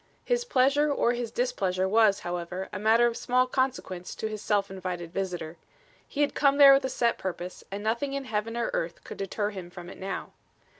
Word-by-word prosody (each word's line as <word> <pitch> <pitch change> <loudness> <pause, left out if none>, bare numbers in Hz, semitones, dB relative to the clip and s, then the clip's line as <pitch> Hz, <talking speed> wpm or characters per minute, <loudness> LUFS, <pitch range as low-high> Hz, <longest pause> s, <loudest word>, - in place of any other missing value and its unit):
His 485 -1 +1
pleasure 285 - +3
or 240 -3 +2
his 240 -1 -3
displeasure 195 -7 0
was, 210 0 +4
however, 175 +2 -4
a - - -3
matter 225 +3 +4
of 235 -1 +1
small 250 +2 +2
consequence 255 -9 -2
to - - -5
his 215 -1 -5
self 205 -2 0
invited 180 -3 -5
visitor. 175 -4 -4 0.5
He 290 - -3
had 290 - +2
come 280 -1 +3
there 280 -1 +10
with 270 0 +3
a - - -1
set 235 -2 0
purpose, 180 -1 -5
and 200 +1 -5
nothing 235 +6 -1
in 275 -1 -3
heaven 225 0 -2
or 235 - -1
earth 165 +1 -3
could - - -9
deter 205 +2 -2
him 185 -4 -8
from 175 0 -10
it - - -12
now. 190 -1 -5
215 Hz, 205 wpm, -28 LUFS, 185-255 Hz, 0.5 s, there